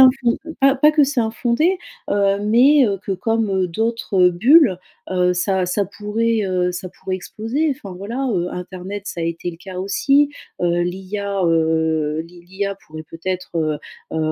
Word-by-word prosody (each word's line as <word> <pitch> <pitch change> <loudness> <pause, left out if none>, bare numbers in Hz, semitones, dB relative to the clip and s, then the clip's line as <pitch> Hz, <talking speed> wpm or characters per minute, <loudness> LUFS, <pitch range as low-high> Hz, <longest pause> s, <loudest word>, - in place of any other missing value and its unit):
infon 255 -2 +5 0.2
pas 275 0 +5
pas 300 +3 +5
que 300 -1 +4
c'est 275 -2 0
infondé, 240 +10 +1 0.3
heu, 200 -1 +2
mais 260 +4 +5
heu, 200 -1 -1
que 195 - -2
comme 200 -2 0
d'autres 200 -1 +1
bulles, 220 - +5 0.3
heu, 180 -1 +2
ça 185 0 0
ça 200 +3 0
pourrait, 210 +3 -1
heu 180 -1 0
ça 180 +1 -5
pourrait 185 +1 -5
exploser. 225 - -2
Enfin 200 -8 -9
voilà, 240 +7 -3
heu, 180 -3 0
internet 185 +2 -6
ça 170 - -5
a - - 0
été 170 +1 -3
le 165 - -12
cas 185 +1 -9
aussi, 275 +9 +2 0.3
heu, 175 0 +2
l'IA 195 +2 -3
heu 160 -1 +1
l'I 175 0 -15
l'IA 200 +1 -3
pourrait 155 0 -8
peut-être, 185 +2 -4
heu 155 -2 0 0.4
heu - - +1
195 Hz, 170 wpm, -20 LUFS, 180-230 Hz, 0.4 s, infon